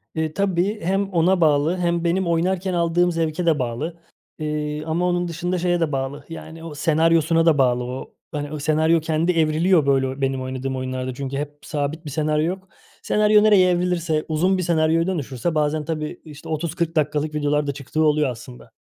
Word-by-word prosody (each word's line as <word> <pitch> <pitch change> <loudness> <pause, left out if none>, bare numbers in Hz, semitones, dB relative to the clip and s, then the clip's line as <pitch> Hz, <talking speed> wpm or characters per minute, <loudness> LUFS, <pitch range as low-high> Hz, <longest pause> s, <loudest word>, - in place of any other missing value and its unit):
Eee, 160 -1 -1
tabii. 195 +2 0
Hem 195 +3 0
ona 175 +2 +3
bağlı 155 +2 +3
hem 170 -1 0
benim 175 +2 +1
oynarken 180 +3 0
aldığım 175 +1 +2
zevke 165 +1 -1
de 160 -3 +3
bağlı, 130 +7 -3 0.4
eee, 150 0 -3
ama 165 +3 0
onun 175 0 0
dışında 175 +2 -2
şeye 175 0 +1
de 165 -3 0
bağlı, 135 +1 -3
yani, 165 0 -9
o 165 -3 -7
senaryosuna 165 +1 +3
da 165 -3 +4
bağlı. 125 -2 +2
O, 125 +2 -7 0.2
hani, 145 -1 -4
o 155 - -5
senaryo 160 +3 +2
kendi 160 +2 0
evriliyor, 160 0 +3
böyle, 135 -1 +1
benim 135 -1 0
oynadığım 130 +1 -4
oyunlarda 130 0 -3
çünkü 135 +1 -4
hep 145 +1 -5
sabit 155 +2 -3
bir - - -5
senaryo 150 +1 0
yok. 190 +2 -4 0.3
Senaryo 210 0 +4
nereye 200 -4 +5
evrilirse, 175 -3 0
uzun 180 +5 +1
bir 185 - -1
senaryoya 165 0 +2
dönüşürse 155 -3 -2
bazen, 150 0 0
tabii, 155 -1 -4
işte, 150 -2 -11
30-40 165 +1 -2
dakikalık 150 0 0
videolar 150 0 0
da - - +1
çıktığı 140 +3 -2
oluyor 150 -2 +3
aslında. 125 -1 -10
155 Hz, 180 wpm, -22 LUFS, 145-170 Hz, 0.4 s, nereye